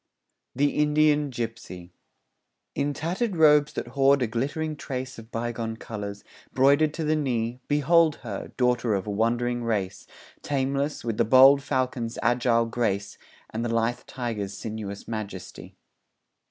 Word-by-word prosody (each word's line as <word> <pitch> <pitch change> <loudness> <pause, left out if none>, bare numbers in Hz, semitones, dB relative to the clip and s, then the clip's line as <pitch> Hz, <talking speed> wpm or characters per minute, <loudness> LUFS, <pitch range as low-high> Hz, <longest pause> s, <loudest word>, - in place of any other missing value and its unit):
THE 145 +1 +1
INDIAN 150 0 +3
GIPSY 115 -7 -6 0.8
In 145 +1 -1
tattered 180 - -2
robes 150 -2 +5
that 120 - -5
hoard 135 +1 +3
a - - +2
glittering 145 +7 -2
trace 130 -3 -6
Of 110 0 -13
bygone 115 -1 -3
colours, 100 -3 -7 0.3
broidered 140 +4 +4
to 165 - -3
the 155 0 +1
knee, 125 -5 -1
Behold 155 +2 +3
her, 105 -5 -6
daughter 125 -3 +2
of 95 - -3
a 105 - -3
wandering 120 +3 0
race, 105 -5 -2 0.3
Tameless, 140 +1 -1
with 115 -2 -3
the - - +4
bold 135 +4 +7
falcon's 130 -4 -2
agile 120 -1 +2
grace, 100 -4 -2 0.3
And 110 +1 -3
the 120 - -2
lithe 115 +1 0
tiger's 110 -6 -4
sinuous 105 -2 -6
majesty. 100 -5 -7
120 Hz, 140 wpm, -26 LUFS, 115-145 Hz, 0.8 s, bold